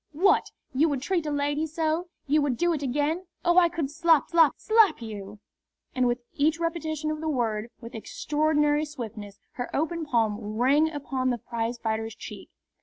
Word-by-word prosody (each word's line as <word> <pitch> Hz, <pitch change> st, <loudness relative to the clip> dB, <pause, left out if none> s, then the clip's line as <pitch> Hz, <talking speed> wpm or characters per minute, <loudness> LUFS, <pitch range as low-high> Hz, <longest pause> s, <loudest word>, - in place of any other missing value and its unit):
What! 370 Hz, +7 st, +3 dB, 0.3 s
you 300 Hz, +5 st, +3 dB
would 275 Hz, -3 st, -2 dB
treat 345 Hz, -3 st, 0 dB
a -, -, -1 dB
lady 290 Hz, +2 st, 0 dB
so 320 Hz, +2 st, -1 dB, 0.2 s
you 295 Hz, +2 st, +3 dB
would 275 Hz, -4 st, 0 dB
do 345 Hz, +4 st, +2 dB
it 300 Hz, -, -3 dB
again? 295 Hz, +7 st, -1 dB, 0.2 s
Oh, 345 Hz, +1 st, +6 dB
I 345 Hz, -1 st, +4 dB
could 325 Hz, -5 st, -3 dB
slap, 325 Hz, 0 st, +3 dB
slap, 330 Hz, -3 st, +5 dB
slap 435 Hz, -6 st, +4 dB
you!" 210 Hz, -3 st, -7 dB, 0.6 s
And 255 Hz, -1 st, +2 dB
with 240 Hz, 0 st, -1 dB
each 310 Hz, +3 st, +1 dB
repetition 315 Hz, -2 st, -2 dB
of 310 Hz, 0 st, -4 dB
the 320 Hz, -, -1 dB
word, 230 Hz, -5 st, -1 dB
with 230 Hz, 0 st, -9 dB
extraordinary 295 Hz, +5 st, +1 dB
swiftness, 220 Hz, -9 st, -7 dB
her 245 Hz, -, -5 dB
open 320 Hz, +1 st, -1 dB
palm 215 Hz, -4 st, 0 dB
rang 285 Hz, +6 st, +4 dB
upon 270 Hz, -4 st, -2 dB
the 245 Hz, -, 0 dB
prizefighter's 225 Hz, -1 st, -3 dB
cheek. -, -, -9 dB
290 Hz, 175 wpm, -27 LUFS, 240-320 Hz, 0.6 s, Oh